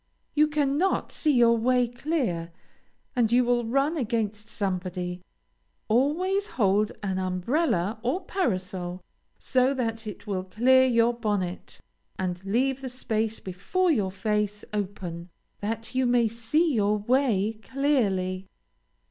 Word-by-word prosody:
You 305 0 +4
cannot 300 +4 +1
see 305 -2 +1
your 235 -2 +5
way 250 +2 +2
clear, 240 - -2 0.6
and 235 -3 +2
you 250 +1 +5
will 240 -1 +1
run 275 +7 +1
against 220 -4 -2
somebody. 180 -3 -3 0.7
Always 350 - +2
hold 205 -1 +3
an 190 -2 -1
umbrella 190 - 0
or 260 +11 -1
parasol 185 - -2 0.4
so 260 +1 +2
that 225 -3 -2
it 210 - -8
will 195 -3 -2
clear 250 +7 +4
your 235 -1 +3
bonnet, 205 -6 -3 0.4
and 180 -1 -3
leave 255 +7 0
the 260 - -4
space 225 -3 -2
before 330 - 0
your 205 -10 +1
face 210 +1 -1
open, 185 -4 -4 0.3
that 225 +3 -4
you 260 0 +2
may 240 -1 +3
see 235 +9 +1
your 210 -2 +2
way 220 -2 +1
clearly. 195 -10 0
225 Hz, 125 wpm, -26 LUFS, 195-260 Hz, 0.7 s, your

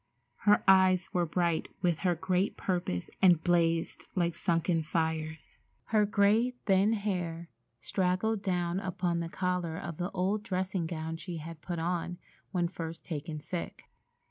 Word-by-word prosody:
Her 210 - +6
eyes 190 -1 +5
were 175 -2 +1
bright 170 -1 0 0.2
with 170 -3 +2
her 180 -2 +2
great 185 +3 0
purpose 175 - -2
and 175 -4 +6
blazed 165 -2 +1
like 175 -2 +1
sunken 170 0 +1
fires. 160 0 -2 0.4
Her 210 -1 +5
gray, 215 +5 +3
thin 195 +2 +4
hair 175 -5 -2 0.3
straggled 190 - 0
down 180 -2 0
upon 180 -3 -1
the 170 0 -3
collar 180 -3 -1
of 170 -5 -6
the 180 +1 -2
old 195 +2 0
dressing 185 -4 -2
gown 160 0 -4
she 175 0 -6
had 160 0 -8
put 175 +1 -4
on 175 +1 -2 0.3
when 175 -2 +1
first 165 -2 -7
taken 155 -1 -4
sick. 170 +3 -6
175 Hz, 145 wpm, -31 LUFS, 165-190 Hz, 0.4 s, Her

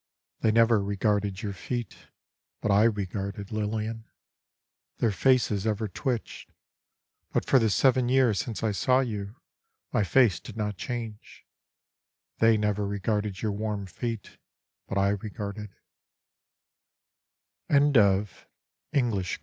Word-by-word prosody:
They 110 - +2
never 115 -1 +4
regarded 100 -1 0
your 100 -2 -3
feet, 120 +5 -4 0.6
But 105 - 0
I 100 +2 +5
regarded, 100 -1 -2
Lilian. 110 +1 -3 0.9
Their 115 - +2
faces 110 -1 +2
ever 110 0 0
twitched. 120 +3 -4 0.8
But - - +1
for 135 - +5
the 110 -2 +2
seven 130 +3 +3
years 125 -6 +3
since 115 -2 -4
I 110 - +2
saw 130 +6 +2
you 105 -4 -4 0.6
My 115 -5 +3
face 110 -2 +4
did 115 - -11
not 105 -1 -2
change. 115 0 -7 0.9
They 115 -1 +5
never 105 -1 0
regarded 100 0 -2
your 110 - +1
warm 105 -1 -3
feet, 115 +2 -6 0.5
But 95 - -2
I 100 0 +3
regarded. 105 +1 -4
105 Hz, 110 wpm, -27 LUFS, 100-115 Hz, 0.9 s, I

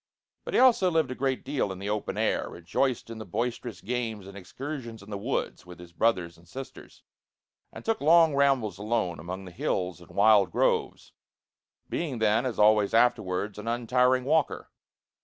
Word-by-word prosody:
But - - -4
he - - +5
also 235 -8 +5
lived 160 -6 +1
a - - -1
great 130 0 -2
deal 135 -7 -1
in 95 - -6
the 100 +2 -4
open 105 -1 -3
air, - - 0
rejoiced 115 +9 -2
in 115 - -7
the - - -5
boisterous 115 +3 -4
games 115 -3 -3
and 100 0 -11
excursions 120 +3 -7
in 105 - -13
the - - -3
woods - - -3
with 90 -1 -12
his 85 0 -13
brothers 85 -5 0
and 85 - -21
sisters, 130 +8 -10 0.7
and - - -11
took 225 0 0
long 165 +1 +5
rambles 130 -9 +2
alone 105 -6 -1
among 90 +4 -6
the 90 - -10
hills 90 -1 -2
and 85 - -15
wild 100 -1 +4
groves; - - 0 0.7
being 150 -7 -3
then, 110 +3 +2
as 120 - -4
always 105 0 +4
afterwards, 105 -4 +1
an 105 - -8
untiring 125 +2 +2
walker. 160 +3 0
110 Hz, 175 wpm, -27 LUFS, 95-130 Hz, 0.7 s, he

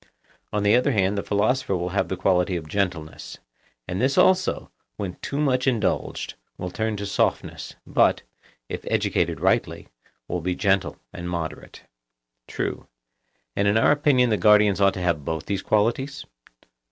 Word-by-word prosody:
On 105 -1 -1
the 105 +2 +5
other 130 +3 +2
hand 100 -1 +2
the 100 - -1
philosopher 110 +3 0
will 90 +1 -3
have 95 - 0
the 95 - -3
quality 90 0 +2
of 80 -3 -5
gentleness. 85 -3 -3 0.5
And 90 +3 -3
this 135 +2 +1
also, 185 0 +3 0.3
when 95 -3 -5
too 140 - -4
much 130 -3 +1
indulged, 115 -7 -1 0.2
will 90 - -5
turn 110 +2 -2
to 100 - -4
softness, 100 - -1
but, - - +2 0.4
if - - -6
educated - - 0
rightly, - - 0 0.4
will 90 0 -3
be 90 +2 -1
gentle 95 -7 +1 0.2
and 85 0 -6
moderate. 85 -3 -6 0.6
True. - - -4 0.7
And 100 - +1
in 100 +2 +3
our 110 - +4
opinion 140 -5 +3
the 105 - +2
guardians 105 -2 +4
ought 100 0 +4
to 90 - -4
have 85 -5 0
both 80 +1 -3
these 100 -2 -2
qualities? 120 +7 0
100 Hz, 160 wpm, -24 LUFS, 90-115 Hz, 0.7 s, the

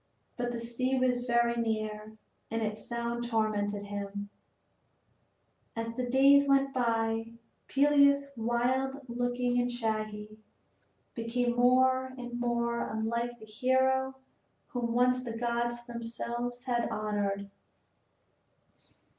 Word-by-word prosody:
But 245 0 -2
the 240 - -4
sea 255 +3 -1
was 250 -1 +1
very 235 0 +3
near 215 -1 -3 0.3
and 225 0 -1
its 215 0 -3
sound 235 0 -2
tormented 210 -3 0
him, 205 0 -5 1.5
and 230 0 -2
as - - -6
the 250 0 -2
days 280 +2 +6
went 275 0 +3
by, 225 -2 0 0.3
Peleus, 280 0 +4
wild 255 +4 0
looking 245 0 0
and 245 0 -1
shaggy, 215 -2 -3 0.7
became 240 +1 -1
more 260 +1 +3
and 245 -1 -6
more 235 -1 0
unlike 235 +2 -2
the 220 - -12
hero 260 +4 +1 0.5
whom 240 -2 -2
once 250 +1 +3
the 230 -2 -5
gods 240 0 -1
themselves 240 +1 -4
had 240 -2 0
honored. 200 -2 -2
240 Hz, 115 wpm, -30 LUFS, 225-250 Hz, 1.5 s, days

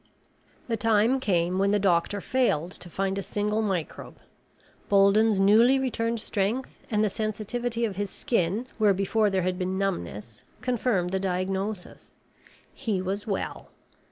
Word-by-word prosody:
The 230 -2 -1
time 225 +4 +3
came 180 -5 +1
when 195 +1 +3
the 205 - +3
doctor 195 +1 +1
failed 185 - 0
to 180 - -8
find 195 +2 -1
a - - -2
single 210 +2 -1
microbe. 190 -7 -3 0.7
Bolden's 200 +1 +4
newly 225 +7 +5
returned 235 -3 -1
strength 215 +5 -2
and 210 -1 +1
the - - +3
sensitivity 225 +3 -2
of 200 -4 -4
his 205 -1 -2
skin 200 +2 -1
where 205 -3 +4
before 205 +3 +1
there 190 -2 0
had 180 0 -1
been 185 +1 -1
numbness 110 - -4 0.2
confirmed 240 -7 0
the 190 - 0
diagnosis. 190 +1 -3 0.6
He 220 -8 -2
was 195 +4 -3
well. 200 - -4
200 Hz, 145 wpm, -26 LUFS, 190-225 Hz, 0.7 s, newly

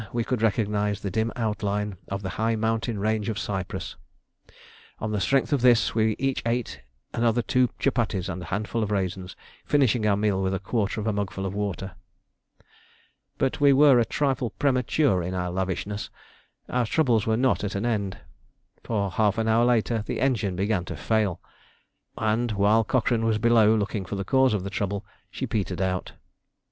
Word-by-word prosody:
we 120 -1 -1
could 125 -1 -2
recognise 105 -2 0
the 100 - -3
dim 110 +3 0
outline 105 -3 -2
of 100 +1 -4
the 95 - -3
high 115 0 +2
mountain 110 +1 -1
range 110 +1 0
of 110 - -3
Cyprus: 95 -3 -4 1.0
on 110 - -3
the 105 -2 -1
strength 135 +5 +2
of 140 - +1
this 120 -3 +4
we 110 -1 +2
each 135 -1 -1
ate 115 - -2 0.3
another 120 0 +1
two 125 -1 +2
chupatties 110 -8 0
and 90 -1 -4
a - - -7
handful 105 +6 -2
of 105 - -1
raisins, 95 -3 -2 0.3
finishing 125 -6 +2
our 100 -1 +3
meal 100 -2 +1
with 95 0 0
a - - -2
quarter 105 +1 -1
of 105 - -3
a 110 - +1
mugful 100 -1 -3
of 95 - -3
water. 100 -1 -3 1.5
But 135 +2 -1
we 140 -1 +6
were 135 -2 +6
a - - +4
trifle 130 -1 0
premature 130 - +1
in 90 +2 -3
our 90 -1 -2
lavishness. 95 +3 -3 0.6
Our 125 -2 0
troubles 120 -7 +2
were 110 0 +2
not 130 -2 +1
at 100 - -3
an 100 +4 -1
end, 105 -5 -1 0.7
for 100 -4 -1
half 105 +2 +1
an 110 0 0
hour 115 +2 +4
later 115 -2 +2
the - - -3
engine 110 -8 0
began 100 0 0
to 90 - -6
fail, 105 +2 0 0.8
and, 110 +1 0
while 105 +3 +3
Cochrane 115 0 +1
was 110 -1 +2
below 110 -1 +4
looking 105 -2 -2
for 100 - -5
the 100 0 -3
cause 130 0 +3
of 95 - -2
the 100 - -5
trouble, 100 0 -2 0.2
she - - -4
petered 95 -4 -2
out. 95 -1 -2
110 Hz, 180 wpm, -25 LUFS, 100-120 Hz, 1.5 s, we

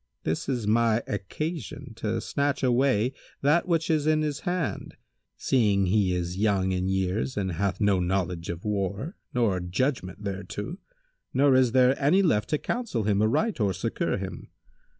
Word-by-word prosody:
This 80 - -2
is 125 -5 -1
my 115 +1 +3
occasion 135 - -5
to 110 0 -1
snatch 140 -1 -1
away 125 -1 +2 0.3
that 150 +6 +3
which 165 -2 +1
is 155 -1 +1
in 155 0 +3
his 150 -1 -2
hand, 175 -3 -3 0.4
seeing 105 -7 +2
he 95 0 +2
is 90 +1 -3
young 100 -3 +2
in 90 0 -1
years 95 +5 -1
and 95 -2 -1
hath 95 +2 -1
no 100 -3 +3
knowledge 90 -2 -1
of 85 +3 -5
war 105 - -2 0.2
nor 115 -7 +1
judgment 95 +2 -2
thereto, 100 - -5 0.6
nor 140 +1 +5
is 130 -2 +4
there 130 +2 +4
any 175 +8 +4
left 105 - +2
to 150 - +2
counsel 225 - -2
him 105 -1 +2
aright 150 - +1
or 100 -3 +2
succour 100 +4 -1
him. 95 -3 -7
110 Hz, 160 wpm, -27 LUFS, 95-140 Hz, 0.6 s, nor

